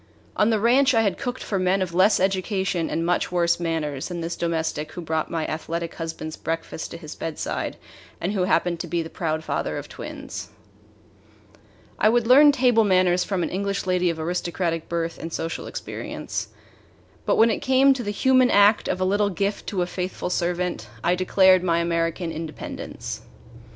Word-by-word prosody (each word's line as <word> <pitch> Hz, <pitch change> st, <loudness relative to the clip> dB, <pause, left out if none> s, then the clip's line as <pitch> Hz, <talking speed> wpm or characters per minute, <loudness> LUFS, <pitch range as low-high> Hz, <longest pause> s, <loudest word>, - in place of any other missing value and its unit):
On 210 Hz, -, +3 dB
the 220 Hz, -2 st, +2 dB
ranch 260 Hz, +4 st, +4 dB
I 225 Hz, -, +4 dB
had 200 Hz, -4 st, 0 dB
cooked 245 Hz, +1 st, -4 dB
for 195 Hz, -, -1 dB
men 185 Hz, +1 st, +2 dB
of 185 Hz, -3 st, -2 dB
less 195 Hz, +4 st, +4 dB
education 190 Hz, -2 st, 0 dB
and 165 Hz, -, -1 dB
much 175 Hz, +1 st, 0 dB
worse 170 Hz, -1 st, +2 dB
manners 155 Hz, -5 st, -2 dB
than 175 Hz, -1 st, -5 dB
this 170 Hz, +1 st, -3 dB
domestic 160 Hz, -2 st, -2 dB
who 175 Hz, -, -6 dB
brought 160 Hz, -1 st, -2 dB
my 165 Hz, -2 st, -2 dB
athletic 165 Hz, +1 st, -4 dB
husband's 160 Hz, -1 st, -6 dB
breakfast 165 Hz, -1 st, -4 dB
to -, -, -8 dB
his 155 Hz, -2 st, -9 dB
bedside 160 Hz, -2 st, -4 dB, 0.4 s
and 180 Hz, -, -1 dB
who 185 Hz, -3 st, +1 dB
happened 175 Hz, -2 st, +1 dB
to 175 Hz, -, -4 dB
be 170 Hz, +1 st, -1 dB
the 160 Hz, -, -9 dB
proud 160 Hz, -2 st, -2 dB
father -, -, -2 dB
of -, -, -6 dB
twins. -, -, -8 dB, 1.5 s
I 215 Hz, -, +5 dB
would 240 Hz, 0 st, +2 dB
learn 285 Hz, +5 st, +8 dB
table 245 Hz, -4 st, +3 dB
manners 185 Hz, -2 st, +3 dB
from 190 Hz, -4 st, -1 dB
an -, -, -1 dB
English 200 Hz, +1 st, -2 dB
lady 180 Hz, -1 st, +2 dB
of 165 Hz, -1 st, -3 dB
aristocratic 170 Hz, 0 st, -2 dB
birth 170 Hz, -1 st, -2 dB
and 165 Hz, -, -6 dB
social 165 Hz, 0 st, -4 dB
experience; -, -, -5 dB, 0.8 s
but -, -, +3 dB
when 225 Hz, +1 st, +5 dB
it -, -, -1 dB
came 265 Hz, +1 st, +4 dB
to 265 Hz, -, -4 dB
the 205 Hz, -, -4 dB
human 255 Hz, +4 st, +4 dB
act 205 Hz, 0 st, +5 dB
of 185 Hz, -, -1 dB
a -, -, +3 dB
little 205 Hz, +2 st, +2 dB
gift 200 Hz, +2 st, -2 dB
to 185 Hz, -4 st, 0 dB
a -, -, -1 dB
faithful 180 Hz, 0 st, -4 dB
servant, 180 Hz, 0 st, -1 dB, 0.2 s
I 175 Hz, -, +3 dB
declared 185 Hz, 0 st, +4 dB
my 170 Hz, -2 st, +2 dB
American 170 Hz, 0 st, -1 dB
independence. 160 Hz, -1 st, -6 dB
180 Hz, 185 wpm, -24 LUFS, 165-200 Hz, 1.5 s, learn